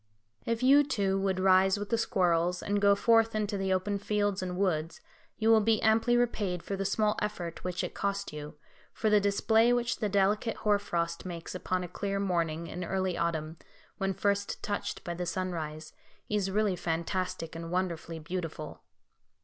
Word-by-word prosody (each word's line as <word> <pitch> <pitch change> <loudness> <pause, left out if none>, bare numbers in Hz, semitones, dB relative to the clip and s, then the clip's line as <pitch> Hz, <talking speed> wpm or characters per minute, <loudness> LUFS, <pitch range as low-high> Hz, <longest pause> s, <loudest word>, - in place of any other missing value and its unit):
If 230 +1 -1
you 280 +3 +7
too, 195 -8 0
would 190 -1 0
rise 190 +1 +4
with 205 +2 -6
the 230 - +3
squirrels, 180 -4 +1
and 205 0 0
go 200 0 +5
forth 225 +1 +3
into 210 -1 -1
the 195 -1 -1
open 190 +2 0
fields 205 -1 0
and 180 -1 -4
woods, 165 -4 -1 0.4
you 220 0 +1
will 220 -1 +6
be 220 0 +3
amply 225 +2 +4
repaid 205 -7 0
for 200 - -3
the 195 0 -3
small 210 +2 +1
effort 180 -6 -4
which 180 -1 -2
it - - -4
cost 200 -3 -2
you, 150 +1 -7 0.4
for 215 - 0
the 210 - +6
display 220 +3 +3
which 240 -1 0
the 210 - 0
delicate 205 +3 +1
hoar 210 -1 +2
frost 170 -4 -2
makes 170 -2 -6
upon 185 0 -2
a - - -4
clear 195 +3 -3
morning 170 -4 -1
in 180 +2 -5
early 190 0 -1
autumn, 160 -1 -2 0.4
when 195 -1 -1
first 200 +1 -1
touched 205 -1 -3
by 175 - -4
the 175 +1 -4
sunrise, 160 -4 -4 0.3
is 205 -2 0
really 205 -1 +1
fantastic 175 0 -3
and 165 0 -6
wonderfully 170 -2 -2
beautiful. 160 -2 -5
190 Hz, 180 wpm, -30 LUFS, 175-210 Hz, 0.4 s, you